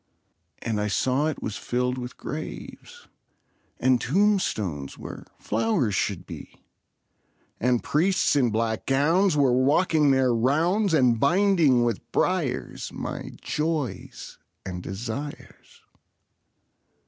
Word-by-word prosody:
And 110 -2 -1
I 105 - 0
saw 130 +8 +1
it 155 - -4
was 105 - -3
filled 125 +1 -1
with 125 0 -7
graves, 475 - -8 0.7
And 130 -2 +3
tombstones 120 - 0
where - - -9
flowers 175 - 0
should - - -1
be; - - -11 0.9
And 125 0 +1
priests 185 +2 +2
in 130 -4 +3
black 110 0 -2
gowns 160 +6 +3
were 135 -4 +4
walking 150 +4 +3
their 130 -2 +3
rounds, 160 - +2
And 125 -5 +3
binding 165 - +3
with 120 -4 -3
briars - - -1
my - - -6
joys 150 - -3 0.3
and 90 -1 -5
desires. 115 +10 -7
130 Hz, 110 wpm, -25 LUFS, 115-160 Hz, 0.9 s, were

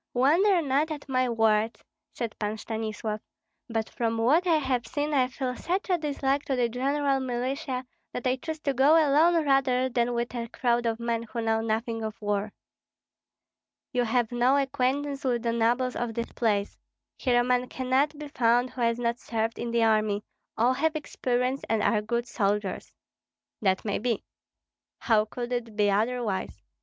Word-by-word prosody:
"Wonder 335 +8 +4
not 285 +3 +1
at 300 -2 -6
my 255 -1 +1
words," 225 -1 +1 0.3
said 230 -3 -4
Pan 210 0 -2
Stanislav, 215 0 -4 0.5
"but 225 -1 -1
from 230 -1 -2
what 295 +11 +3
I 335 - +5
have 260 -5 0
seen 295 +1 -2
I 260 -3 +3
feel 255 -1 -3
such 375 +6 -2
a 360 - +4
dislike 280 -2 0
to 270 - 0
the 245 -2 +1
general 275 +3 0
militia 255 +1 -3 0.3
that 245 - -5
I 255 +1 +2
choose 315 +4 -5
to 280 - 0
go 275 +5 +5
alone 320 +2 +4
rather 260 -2 +2
than 240 -1 0
with 235 +1 -2
a 235 -1 -3
crowd 240 0 0
of 225 0 -1
men 235 -1 -1
who 230 0 -5
know 225 0 +1
nothing 225 +1 -2
of 220 +1 -5
war." 205 -1 -1 1.4
"You 250 -1 +2
have 235 0 +1
no 245 +3 +3
acquaintance 275 +1 -1
with 240 -3 0
the 230 -1 0
nobles 240 +2 +1
of 235 -2 -3
this 235 0 -3
place. 210 -3 -1 0.4
Here 245 -2 +2
a - - +3
man 250 0 +1
cannot 265 +4 0
be 300 -1 -7
found 245 -1 +2
who 255 - -6
has 230 0 +2
not 235 0 -1
served 225 0 -2
in 240 - -3
the 235 0 +2
army; 215 -2 +2 0.3
all 240 +3 +3
have 315 +4 0
experience 255 -3 -1
and 220 -2 +1
are 215 -2 +2
good 235 +3 -2
soldiers." 205 -3 -1 0.7
"That 190 -1 +1
may 205 - -1
be." 230 -1 -1 0.7
"How 215 -3 +2
could 240 +3 -5
it 230 -3 -3
be 205 -1 +3
otherwise? 215 - -1
245 Hz, 175 wpm, -27 LUFS, 225-270 Hz, 1.4 s, I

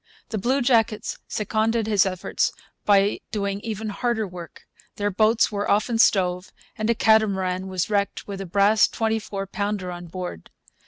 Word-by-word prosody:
The 220 - -2
bluejackets 240 -2 +1
seconded 220 +1 0
his 205 -3 +3
efforts 185 -1 -1 0.3
by 200 0 +3
doing 200 -2 -2
even 220 0 -4
harder 220 +1 -1
work. 175 -2 -10 0.3
Their 205 0 -1
boats 220 +4 +3
were 205 0 -2
often 225 +3 +1
stove, 180 -4 +2 0.2
and 215 0 -2
a 235 - +3
catamaran 190 -5 +2
was 185 -2 -1
wrecked 200 -1 -1
with 195 -1 -5
a 195 - -6
brass 205 +4 +4
twenty 225 -1 -1
four 195 -2 -5
pounder 200 -2 -3
on 175 0 -8
board. 175 - -7
205 Hz, 155 wpm, -24 LUFS, 190-220 Hz, 0.3 s, brass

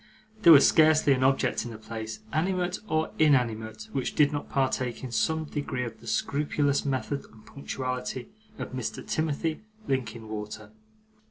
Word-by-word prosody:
There 170 - +8
was 145 -3 +9
scarcely 155 -2 +5
an 130 0 0
object 130 -3 +2
in 120 - -6
the 115 - -8
place, 110 0 -7
animate 180 +2 0
or 155 0 0
inanimate, 115 -7 +2
which 135 -2 -2
did 150 -1 +4
not 145 -1 -4
partake 130 -3 -1
in 130 - -5
some 160 +8 +1
degree 145 -4 -3
of 115 -2 -7
the 115 - -14
scrupulous 145 +4 0
method 140 +1 -2
and 110 -1 -18
punctuality 130 -2 -4 0.3
of - - -6
Mr. 125 -3 -5
Timothy 155 0 -1 0.3
Linkinwater. 110 -4 -4
130 Hz, 150 wpm, -28 LUFS, 115-150 Hz, 0.3 s, was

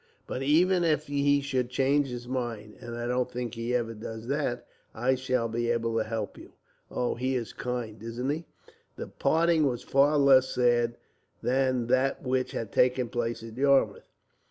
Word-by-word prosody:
But 130 - -4
even 175 +6 +3
if 155 -3 +1
he 145 0 +2
should 130 -3 -1
change 135 +2 +2
his 120 -1 -7
mind, 120 -4 -4
and 120 0 -6
I 120 - -3
don't 125 +1 0
think 120 -2 -4
he 115 +1 -2
ever 115 -2 -1
does 110 +1 -7
that, 125 -4 -1 0.3
I 125 +4 +2
shall 130 -2 0
be 120 +1 -2
able 115 -1 0
to 110 - +2
help 110 -2 -4
you. - - -14 0.4
"Oh, 125 - -1
he 130 +2 -1
is 120 -3 -3
kind, 120 -4 -4
isn't 120 +4 -3
he?" 160 +3 -4 0.5
The - - -5
parting 165 -2 +2
was 120 -3 -2
far 145 +2 +3
less 135 -2 +5
sad 120 -1 +2 0.5
than 130 -1 +1
that 130 +4 +1
which 130 -1 -1
had 115 - -4
taken 125 -1 +2
place 120 -1 -2
at 115 -1 -9
Yarmouth. 135 -6 +2
125 Hz, 180 wpm, -28 LUFS, 120-135 Hz, 0.5 s, less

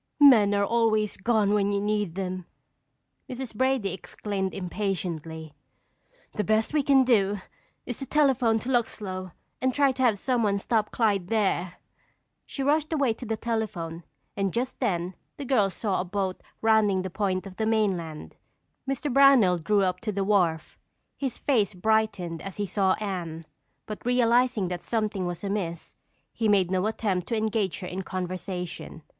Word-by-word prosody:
"Men 225 -8 +7
are 200 0 +2
always 215 -2 +1
gone 210 -1 +2
when 205 -1 +2
you 200 - +1
need 205 -4 -1
them!" 185 -2 -4 0.8
Mrs. 255 -2 -6
Brady 255 -5 +1
exclaimed 190 +1 -4
impatiently. 175 -5 -4 0.8
"The 210 - -1
best 220 +6 +1
we 300 - +3
can 270 -1 +5
do 205 -5 +3 0.5
is 245 - -5
to 270 - -5
telephone 265 -6 +3
to 250 - -5
Luxlow 190 -6 -2 0.3
and 260 -1 +1
try 280 -2 +4
to 260 - -5
have 235 -5 +3
someone 220 -3 +1
stop 215 +1 0
Clyde 205 -6 +1
there." 190 -5 0 0.7
She 275 - -4
rushed 305 +3 +1
away 280 -7 +2
to 240 +2 -9
the 220 0 -1
telephone 205 -8 -3 0.3
and 195 -2 0
just 250 +5 -3
then 180 -7 -1 0.2
the 285 - -5
girls 210 -8 +2
saw 200 -5 0
a - - -2
boat 190 0 -3 0.2
rounding 215 -4 +3
the 190 - -5
point 190 -1 -1
of 190 -1 -10
the 220 - 0
mainland. 185 -8 -1 0.5
Mr. 275 0 -2
Brownell 260 -10 +6
drew 200 +5 +2
up 180 -1 0
to 220 - -2
the 200 -1 -1
wharf. 180 -6 +1 0.4
His 270 -3 -3
face 215 -8 +1
brightened 195 -5 0
as 195 -2 -7
he 205 - -1
saw 195 -1 +2
Anne, 175 -6 -5 0.4
but 215 - -7
realizing 245 -3 +2
that 180 -1 -4
something 215 -5 -1
was 175 +1 -5
amiss, 195 -5 -3 0.4
he 220 -2 0
made 190 -3 +3
no 185 +2 +1
attempt 200 -5 -1
to 230 - -1
engage 215 -4 -1
her 180 - -5
in 185 +2 -4
conversation. 180 -3 -5
205 Hz, 160 wpm, -26 LUFS, 185-230 Hz, 0.8 s, Men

